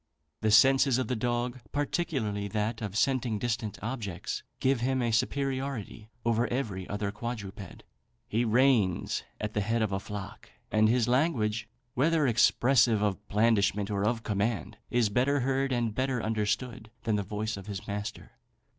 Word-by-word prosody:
The 110 - +2
senses 135 +4 +6
of 130 - -1
the 125 - +1
dog, 120 +2 -1
particularly 135 - -1
that 110 +2 -2
of 105 -2 -3
scenting 125 -4 +1
distant 115 -2 -2
objects, 110 -7 -4 0.2
give 130 -1 +2
him 130 +2 0
a 120 -2 +1
superiority 130 -3 -2 0.2
over 115 +1 +2
every 105 -8 -3
other 105 0 -2
quadruped. 105 -4 -7 0.4
He 115 +3 +1
reigns 115 -5 +2 0.2
at 105 0 -3
the 105 - 0
head 115 +2 +1
of 105 - -1
a 95 - 0
flock; 105 +1 -8 0.2
and 110 +1 +4
his 120 -1 +2
language, 120 -5 +1 0.2
whether 155 +3 +2
expressive 120 -2 +4
of 105 0 -1
blandishment 105 -1 +2
or 100 -1 0
of 115 +1 0
command, 105 +1 -1
is 120 -3 +2
better 130 +6 +2
heard 135 +1 0
and 120 -3 0
better 130 +1 0
understood 110 +2 -2
than 110 -3 +1
the 105 - 0
voice 105 +2 -3
of 100 0 -9
his 100 -3 -5
master. 105 +1 -5
115 Hz, 155 wpm, -29 LUFS, 105-125 Hz, 0.4 s, senses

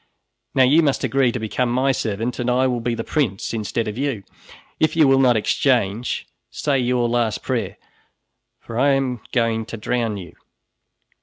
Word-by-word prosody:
Now 130 - +5
you 145 +6 +5
must 140 -4 0
agree 135 -3 +2
to 125 - -3
become 120 +2 -1
my 130 +2 +2
servant, 115 -1 -2
and 125 0 -1
I 125 +1 +2
will 125 -2 0
be 115 0 -2
the 115 - -4
prince 115 -11 -1
instead 115 +1 -2
of 105 +3 -5
you. 135 -8 -2 0.6
If 155 0 +2
you 155 -3 +5
will 135 0 +4
not 125 -3 +4
exchange, 115 -1 0 0.2
say 140 -3 0
your 125 -1 +1
last 120 -2 0
prayer, - - -2 0.8
for 115 0 -6
I 140 +1 +4
am 130 -4 -1
going 115 -2 +1
to 115 - -6
drown 115 -1 -1
you." 90 -3 -9
125 Hz, 175 wpm, -21 LUFS, 115-135 Hz, 0.8 s, Now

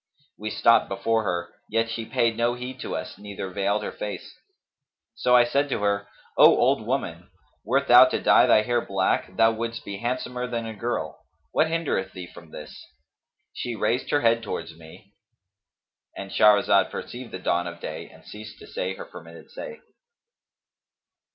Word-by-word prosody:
We 105 +1 -5
stopped 115 +2 +3
before 110 +3 0
her, 85 -2 -3 0.2
yet 115 +1 +1
she 115 0 -5
paid 115 -1 +1
no 120 +1 +1
heed 125 +1 -7
to - - -4
us - - -6
neither 100 -2 -7
veiled 100 +2 0
her - - -4
face: 105 - -7 0.8
so 125 0 +2
I 120 - +7
said 140 +4 0
to 105 - -2
her, 100 0 0 0.3
'O - - +8
old - - +2
woman,[FN#251] - - -3 0.4
wert 130 +6 +1
thou 125 +1 +9
to 130 - -1
dye - - +5
thy 110 - +5
hair 120 +1 +1
black, 95 -1 -1
thou 115 0 +5
wouldst 115 0 -5
be 100 -1 -5
handsomer 125 +1 -3
than 120 -2 -3
a 110 - -5
girl: 115 +3 -4 0.3
what 160 - +2
hindereth 160 -13 -2
thee 90 -2 -7
from 85 -1 -14
this?' 75 0 -10 0.7
She 120 -1 -4
raised 115 +4 -1
her 145 - +2
head 115 0 +3
towards 105 - -6
me"—And 85 +3 -16
Shahrazad 105 -1 +4
perceived 120 0 -7
the - - -5
dawn 90 -1 0
of 85 0 -8
day - - -7
and - - -18
ceased 105 +1 -10
to - - -13
say 95 +1 -4
her - - -8
permitted 85 0 -13
say. 480 -2 -8
115 Hz, 170 wpm, -25 LUFS, 95-120 Hz, 0.8 s, thou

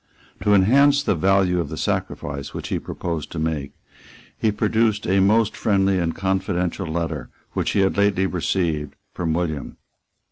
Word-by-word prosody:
To 105 0 +4
enhance 140 +9 +5
the - - +2
value 95 +1 +2
of 80 -4 -2
the - - -6
sacrifice 70 -1 -3
which - - -5
he - - -1
proposed 85 -4 -5
to - - -5
make, 80 -3 -2 0.6
he 110 - +1
produced 110 0 +1
a 95 +2 +2
most 105 +3 +3
friendly 95 -2 +2
and 85 -2 -1
confidential 95 -1 -1
letter 80 -5 -3 0.2
which - - -1
he 100 - +3
had 95 0 +1
lately 100 -2 +3
received 85 -5 -1 0.2
from 85 -2 -2
William. 80 -4 -3
95 Hz, 155 wpm, -22 LUFS, 80-100 Hz, 0.6 s, enhance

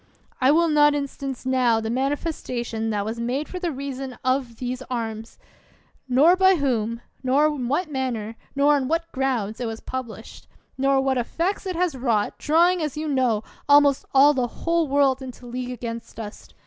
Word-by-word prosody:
I 260 - +5
will 335 +3 +4
not 295 -1 +4
instance 275 -2 -4
now 250 -3 +3
the 225 0 -3
manifes 280 +6 -1
tation 235 -2 -3
that 205 -2 -1
was 225 +2 -4
made 255 +6 -2
for 365 - -6
the 350 -2 -2
reason 270 -2 -6
of 255 -2 0
these 250 +1 -4
arms; 225 -2 -4 0.7
nor 290 +8 +6
by 380 0 +5
whom, 235 -6 -1 0.2
nor 270 +3 +3
in 295 -5 -1
what 305 +5 -1
manner, 235 -5 -3 0.2
nor 285 +1 +4
on 265 -2 -2
what 330 +2 -1
grounds 245 -6 -1
it 240 - -1
was 225 0 -5
published; 235 -4 -7 0.3
nor 275 0 +2
what 265 -1 +1
effects 350 - -2
it 370 - -3
has 345 -4 0
wrought, 235 -5 0
drawing, 340 +4 +3
as 300 -2 -3
you 310 +1 -3
know, 255 -6 +1 0.3
almost 285 -1 +5
all 280 +2 +6
the 255 -3 0
whole 335 +6 -1
world 275 -1 +2
into 255 -1 -9
league 250 +1 -5
against 230 -2 -6
us 210 -1 -8
265 Hz, 180 wpm, -24 LUFS, 235-295 Hz, 0.7 s, nor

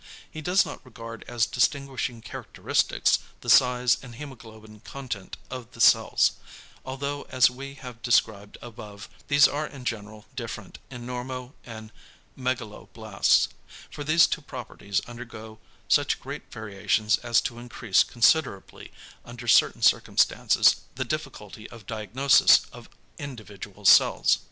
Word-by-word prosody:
He 155 - -7
does 180 +5 +3
not - - -9
regard 115 -2 -10
as 120 -2 +1
distinguishing 130 -2 -1
characteristics, - - 0 0.2
the - - 0
size 125 -1 +4
and 125 -3 -11
hæmoglobin 110 -6 -12
content 125 -8 -7
of 125 -2 -8
the - - -14
cells - - +4 0.5
although 140 +2 -5
as 125 -1 +4
we 135 +2 -9
have 125 -4 -11
described 105 -4 0
above, 105 -3 -10 0.2
these 145 0 +6
are 150 +1 -3
in 135 -4 -12
general 105 -2 -5
different 110 -5 -7
in 125 -2 -9
normo 125 +1 -6
and 110 -1 -10 0.4
megaloblasts 110 -4 0 0.4
for 145 - -7
these 155 +3 +5
two - - -3
properties 110 -7 -5
undergo 115 -2 -10 0.3
such - - +2
great - - -9
variations 105 0 0
as 120 -1 +2
to 120 - -5
increase 120 -4 +1
considerably 120 -4 0 0.3
under 120 0 -10
certain - - +4
circumstances - - +3 0.2
the - - -3
difficulty 110 +1 -6
of 115 -3 -13
diagnosis 115 +6 +4
of - - -13 0.3
individual 105 -7 -9
cells. - - +5
120 Hz, 125 wpm, -26 LUFS, 110-130 Hz, 0.5 s, these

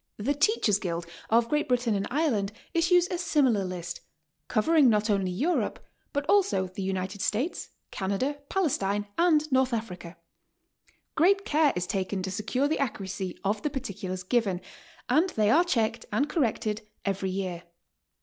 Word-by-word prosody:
The 240 +8 0
Teachers' 290 - +2
Guild 170 -4 -3 0.2
of 230 +1 +4
Great 300 +4 0
Britain 245 -2 +1
and 200 0 -1
Ireland 240 -9 0 0.2
issues 350 +1 +4
a 355 - -2
similar 270 - +2
list, 175 -2 -5 0.5
covering 280 +4 +4
not 210 0 +2
only 195 -2 +1
Europe, 280 - 0 0.3
but 285 0 -2
also 400 - +3
the 185 +2 -7
United 190 +1 -3
States, 250 - -1 0.2
Canada, 205 +10 -2
Palestine 205 - 0
and 320 -3 +4
North 260 -1 +3
Africa. 180 -6 -5 1.0
Great 390 +5 +3
care 300 -1 +3
is 180 0 -1
taken 190 +1 -2
to 190 - -3
secure 225 +7 0
the 315 - -1
accuracy 195 -7 -3
of 205 +1 0
the 300 - -1
particulars 195 -8 -5
given, 195 -3 +1 0.5
and 345 +5 +3
they 215 -8 +2
are 335 +4 +6
checked 230 -8 -1
and 250 +8 +1
corrected 225 - -1 0.2
every 195 -1 -1
.year. 185 -2 -3
220 Hz, 150 wpm, -28 LUFS, 195-290 Hz, 1.0 s, are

